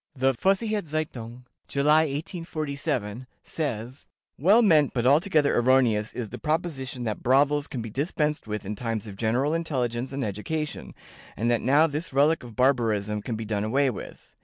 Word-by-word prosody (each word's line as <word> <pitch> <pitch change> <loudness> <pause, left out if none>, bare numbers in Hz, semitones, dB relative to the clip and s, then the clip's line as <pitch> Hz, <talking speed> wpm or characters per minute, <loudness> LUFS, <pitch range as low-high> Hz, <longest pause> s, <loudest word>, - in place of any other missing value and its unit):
The 135 0 +2
Vossicher 205 - +1
Zeitung 125 -6 -5 0.2
(July, 150 +3 +3
1847), 145 - -4 0.2
says: 130 -4 -5 0.3
"Well 205 - +5
meant 155 -10 +4
but 120 -1 0
altogether 150 +2 +3
erroneous 120 -4 +3
is 115 -4 -4
the - - -8
proposition 150 -6 -2
that 110 -3 -3
brothels 140 +3 +3
can 120 -4 -5
be 115 - -7
dispensed 150 - -1
with 105 -1 -4
in 105 - -3
times 115 -1 -3
of 105 -3 -8
general 120 +8 0
intelligence 130 -7 -2
and 135 -2 -2
education, 150 +10 -4 0.4
and 115 +2 +1
that 120 - +1
now 145 +5 +4
this 155 +1 -3
relic 145 +4 +3
of 120 -3 -11
barbarism 110 -5 +1
can 115 +2 -4
be 110 0 -5
done 105 -1 -1
away 130 +5 +2
with. 105 - -10
135 Hz, 160 wpm, -26 LUFS, 115-150 Hz, 0.4 s, Well